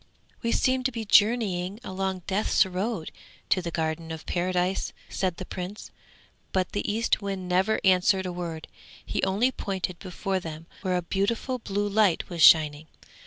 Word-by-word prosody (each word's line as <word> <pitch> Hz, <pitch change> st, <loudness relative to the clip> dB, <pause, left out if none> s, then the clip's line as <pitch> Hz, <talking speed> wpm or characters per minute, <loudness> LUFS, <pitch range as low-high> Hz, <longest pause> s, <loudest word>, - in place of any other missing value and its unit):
'We 230 Hz, -1 st, 0 dB
seem 260 Hz, 0 st, +2 dB
to 260 Hz, -, +2 dB
be 230 Hz, -2 st, -5 dB
journeying 205 Hz, -3 st, +3 dB
along 190 Hz, -3 st, -3 dB
Death's 200 Hz, +1 st, +2 dB
road 190 Hz, -1 st, -3 dB, 0.4 s
to 185 Hz, -, +3 dB
the 175 Hz, -, -4 dB
Garden 160 Hz, 0 st, -2 dB
of 160 Hz, 0 st, -7 dB
Paradise!' 180 Hz, +1 st, -1 dB, 0.2 s
said 185 Hz, -3 st, -1 dB
the 185 Hz, -, -6 dB
Prince, 185 Hz, +4 st, -7 dB, 0.6 s
but 185 Hz, -1 st, 0 dB
the 205 Hz, -, -1 dB
Eastwind 200 Hz, -4 st, -1 dB
never 185 Hz, +4 st, +2 dB
answered 190 Hz, 0 st, +4 dB
a 180 Hz, -, -3 dB
word, 170 Hz, -3 st, -5 dB, 0.4 s
he -, -, -2 dB
only 205 Hz, +7 st, +2 dB
pointed 190 Hz, -6 st, -4 dB
before 190 Hz, +1 st, -3 dB
them 160 Hz, -2 st, -8 dB, 0.2 s
where 185 Hz, -4 st, 0 dB
a 180 Hz, -, -2 dB
beautiful 225 Hz, +8 st, -1 dB
blue 205 Hz, -2 st, -2 dB
light 200 Hz, -4 st, +2 dB
was 170 Hz, -2 st, -3 dB
shining. 155 Hz, -1 st, +6 dB
190 Hz, 160 wpm, -27 LUFS, 175-205 Hz, 0.6 s, shining